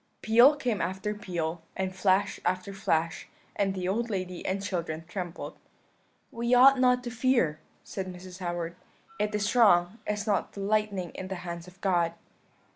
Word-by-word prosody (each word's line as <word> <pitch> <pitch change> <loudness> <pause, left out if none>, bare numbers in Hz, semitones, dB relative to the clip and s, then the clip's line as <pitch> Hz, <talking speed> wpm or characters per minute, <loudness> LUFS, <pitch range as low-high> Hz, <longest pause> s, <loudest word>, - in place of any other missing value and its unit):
"Peal 240 +7 +7
came 245 -8 -1
after 190 +3 -2
peal, 170 -5 -3 0.2
and 190 -1 -2
flash 190 +1 +2
after 185 +2 -1
flash; 165 -4 -1 0.3
and 195 -1 0
the 180 -1 -2
old 230 +5 0
lady 185 -3 -3
and 195 +1 -1
children 165 -4 -3
trembled. 175 -2 -5 0.8
"'We 235 +2 +1
ought 265 +2 +7
not 250 -1 +4
to 240 - -5
fear,' 235 - +2 0.2
said 190 -1 -5
Mrs. 180 +1 -10
Howard; 175 -2 -3 0.4
'it 210 0 0
is 205 +3 0
wrong; 200 -3 +5
is 210 -1 -1
not 205 -4 0
the 200 - -6
lightning 200 -3 0
in 185 - -7
the 190 - -4
hands 170 0 -6
of 180 +1 -15
God?' 170 -3 +1
190 Hz, 165 wpm, -28 LUFS, 175-215 Hz, 0.8 s, Peal